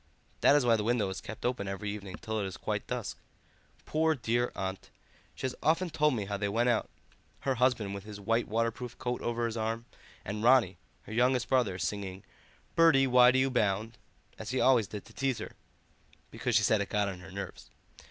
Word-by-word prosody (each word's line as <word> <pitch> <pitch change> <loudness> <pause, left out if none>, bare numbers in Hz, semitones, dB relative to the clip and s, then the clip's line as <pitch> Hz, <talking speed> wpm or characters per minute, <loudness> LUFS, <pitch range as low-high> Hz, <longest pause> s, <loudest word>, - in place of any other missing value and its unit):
That 140 - +6
is 145 -4 +3
why 115 -2 +5
the 105 - -2
window 115 -3 +1
is 95 - -6
kept 110 +3 -8
open 120 -5 -1
every 100 +1 -3
evening 100 -3 -7
till 110 0 -4
it 100 - -1
is 95 - -7
quite - - -3
dusk. - - -4 0.7
Poor 160 +1 +2
dear 120 -1 0
aunt, 95 0 -4 0.5
she - - -10
has 130 - -1
often 165 +3 +2
told 150 -3 +2
me 105 -3 -2
how 100 0 -3
they 100 0 -1
went 120 +4 +2
out, 115 -3 +1 0.5
her 135 - +1
husband 120 -5 +1
with 100 -1 -6
his 105 -1 -9
white 115 +4 0
waterproof 115 +2 -2
coat 125 0 -3
over 120 0 -1
his 115 -1 -3
arm, 115 +1 -2 0.4
and 105 +2 -4
Ronnie, 120 -5 +4 0.2
her - - -9
youngest 125 +1 +2
brother, 120 -8 +2
singing 95 +2 -4 0.5
'Bertie, 160 -5 +6
why 125 -1 +7
do 130 - +3
you 130 0 +2
bound?' 110 -1 0 0.4
as 110 - -6
he 130 +1 0
always 125 -6 +4
did 105 0 -7
to 115 - -16
tease 135 -1 0
her, - - -6 0.8
because - - -1
she - - +5
said 110 -2 +3
it 100 - -3
got 105 -1 +1
on 95 -2 -5
her 90 +1 -11
nerves. 100 +1 -7
115 Hz, 210 wpm, -30 LUFS, 100-125 Hz, 0.8 s, why